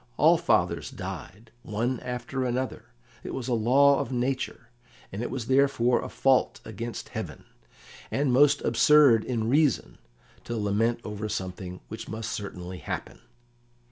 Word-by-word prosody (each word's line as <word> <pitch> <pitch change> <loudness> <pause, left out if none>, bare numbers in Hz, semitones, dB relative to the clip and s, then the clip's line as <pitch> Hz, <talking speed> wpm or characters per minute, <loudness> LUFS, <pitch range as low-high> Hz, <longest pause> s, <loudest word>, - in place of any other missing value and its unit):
All - - +6
fathers - - +1
died, 110 +4 -8
one 120 +3 -2
after 125 +1 -4
another; 125 +1 -2 0.4
it - - -5
was 130 -2 -4
a 125 - 0
law 135 +5 +4
of 120 - -3
nature, 125 -2 -2 0.4
and 100 - -5
it - - -3
was 125 -2 -4
therefore 130 -2 +3
a - - -6
fault 135 -1 +2
against 115 +1 -6
heaven, - - -6 0.6
and 140 -2 +1
most 145 +2 +5
absurd 145 -7 +5
in 115 -3 -2
reason, 145 +1 +1 0.5
to 120 - -3
lament 110 +3 0
over 105 0 -5
something 90 -2 -5
which 110 +1 -7
must 110 0 -4
certainly 90 -3 -6
happen. 75 - -6
120 Hz, 140 wpm, -27 LUFS, 110-130 Hz, 0.6 s, All